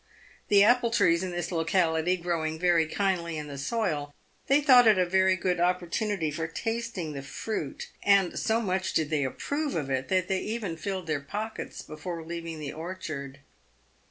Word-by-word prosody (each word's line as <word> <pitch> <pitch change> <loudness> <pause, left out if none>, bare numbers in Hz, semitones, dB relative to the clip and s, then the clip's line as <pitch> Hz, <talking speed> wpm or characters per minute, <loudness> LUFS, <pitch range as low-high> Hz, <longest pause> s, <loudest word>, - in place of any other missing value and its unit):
The 200 -1 +6
apple 240 +2 +4
trees 180 -7 +3
in 185 - -2
this 175 +1 -3
locality 165 0 +1
growing 165 -2 -2
very 170 -2 +3
kindly 170 -2 -1
in 150 - -4
the 145 -1 -7
soil, 150 -5 -2 0.3
they 275 +2 +5
thought 255 -5 +7
it 215 -3 +6
a 185 - +3
very 190 +1 +3
good 180 -1 -1
opportunity 180 0 0
for 160 +2 -3
tasting 225 -4 -3
the 140 - -5
fruit, 145 +4 -5
and 200 -3 +3
so 225 0 +1
much 190 -4 -1
did 155 -1 0
they 150 -2 +1
approve 285 - -2
of 145 -4 -2
it, 130 0 -1
that 185 -1 +1
they 190 -1 0
even 210 -5 -3
filled 185 +2 -4
their 155 -2 -1
pockets 215 +9 -5
before 165 +2 -6
leaving 165 -1 -5
the 145 -2 -5
orchard. 155 -5 -6
175 Hz, 175 wpm, -28 LUFS, 160-200 Hz, 0.3 s, thought